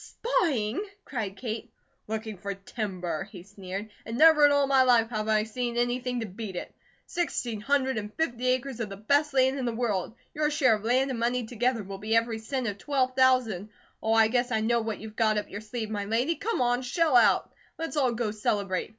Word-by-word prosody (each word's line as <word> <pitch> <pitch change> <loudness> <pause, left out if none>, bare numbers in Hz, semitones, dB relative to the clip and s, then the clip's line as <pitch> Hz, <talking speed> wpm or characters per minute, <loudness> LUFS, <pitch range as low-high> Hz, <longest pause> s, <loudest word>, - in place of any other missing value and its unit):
"Spying?" 285 - 0 0.2
cried 210 -7 -4
Kate. 225 0 -5 0.4
"Looking 220 0 -4
for 200 +2 -5
timber," 195 -4 -4
he 180 -4 -10
sneered. 200 +1 -7
"And 230 +1 -5
never 310 -1 +7
in - - +2
all 285 0 +4
my 270 -1 +4
life 240 -3 +4
have 215 -1 -2
I 215 -1 +3
seen 240 +2 -3
anything 245 0 0
to - - -2
beat 200 -1 -7
it. - - -6 0.3
Sixteen 245 -10 -2
hundred 265 0 +1
and 210 0 -7
fifty 255 -6 -1
acres 255 0 0
of 225 -3 -3
the 195 - -7
best 285 +8 +2
land 265 0 +2
in 255 - -2
the 235 -2 -1
world. 220 -3 -1 0.2
Your 300 0 +1
share 290 -6 +3
of 210 -1 -2
land 260 +4 +2
and 240 - -3
money 240 +1 0
together 245 0 -1
will 195 0 -7
be 215 +2 0
every 230 -1 +1
cent 255 +3 -3
of 205 -3 -3
twelve 260 -1 0
thousand. 250 -7 +3 0.3
Oh, 220 - +1
I 225 -1 +6
guess 245 +2 0
I 220 -2 +1
know 235 +1 +2
what 220 -1 -3
you've 220 0 -10
got 215 -1 +2
up 210 - -3
your 205 - -6
sleeve, 220 0 -5
my 205 -1 -2
lady. 240 +10 +1
Come 445 - -2
on, 245 0 +2
shell 305 +3 +1
out! 245 - +4 0.2
Let's 325 -1 -4
all 265 -4 +2
go 230 -2 -1
celebrate. 200 -3 -1
230 Hz, 215 wpm, -28 LUFS, 215-260 Hz, 0.4 s, never